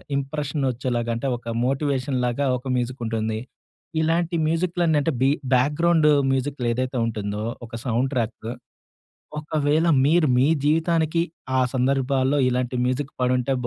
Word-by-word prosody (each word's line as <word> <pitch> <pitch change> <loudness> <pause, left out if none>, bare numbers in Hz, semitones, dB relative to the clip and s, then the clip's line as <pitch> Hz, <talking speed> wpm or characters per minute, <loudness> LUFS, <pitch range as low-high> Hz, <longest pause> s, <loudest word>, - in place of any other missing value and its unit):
Impression 140 +1 -2
వచ్చేలాగా 120 -1 -2
అంటే 115 +4 -3
ఒక 120 - -16 0.2
మోటివేషన్ 135 -1 0
లాగా 125 +4 0
ఒక 125 +2 -10
మ్యూజిక్ 125 +1 -2
ఉంటుంది. 110 -1 -2 0.6
ఇలాంటి 170 +2 +1
మ్యూజిక్‍లన్న 165 -1 +1
అంటే 160 - 0
బీ 135 - +4 0.3
బ్యాగ్రౌండ్ 150 +5 +3 0.2
మ్యూజిక్‌లు 135 -1 -1
ఏదైతే 130 +2 -2
ఉంటుందో, 105 -2 -3 0.2
ఒక 115 - -23
సౌండ్ 125 +2 0
ట్రాక్. 115 -2 -3 0.9
ఒకవేళ 150 +1 +1 0.2
మీరు 160 +3 +4
మీ 125 - +4 0.2
జీవితానికి 165 +1 +2 0.3
ఆ - - +3
సందర్భాల్లో 135 +1 +1
ఇలాంటి 125 0 -1
మ్యూజిక్ 130 +3 -1
పడుంటే 125 +1 +1
135 Hz, 125 wpm, -23 LUFS, 125-150 Hz, 0.9 s, బీ